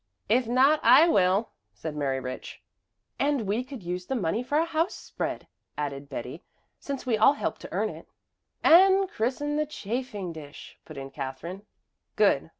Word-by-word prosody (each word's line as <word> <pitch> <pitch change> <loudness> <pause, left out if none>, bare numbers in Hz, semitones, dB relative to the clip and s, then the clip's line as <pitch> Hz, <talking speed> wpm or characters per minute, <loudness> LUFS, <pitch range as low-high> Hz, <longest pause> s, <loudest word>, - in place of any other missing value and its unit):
"If 240 +2 +3
not, 265 +6 +4
I 325 - +7
will," 195 - +2 0.2
said 150 +8 -6
Mary 135 -3 -1
Rich. 130 0 -7 0.6
"And 285 -2 +1
we 210 +5 0
could 260 -5 -9
use 180 +1 -4
the 265 - -1
money 205 0 0
for 290 +4 -1
a 325 - +3
house 330 +2 -1
spread," - - -5 0.3
added 140 -1 -4
Betty, 130 +4 -6 0.4
"since 275 -2 -5
we 230 -4 +1
all 245 +6 +7
help - - -3
to - - -10
earn - - 0
it." - - -11 0.6
"And 380 +3 +6
christen 290 +6 -1
the 305 0 0
chafing 215 - -4
dish," 150 -2 -11
put 155 - -11
in 135 0 -7
Katherine. 150 +9 -6 0.5
"Good. - - +3
215 Hz, 165 wpm, -27 LUFS, -, 0.6 s, I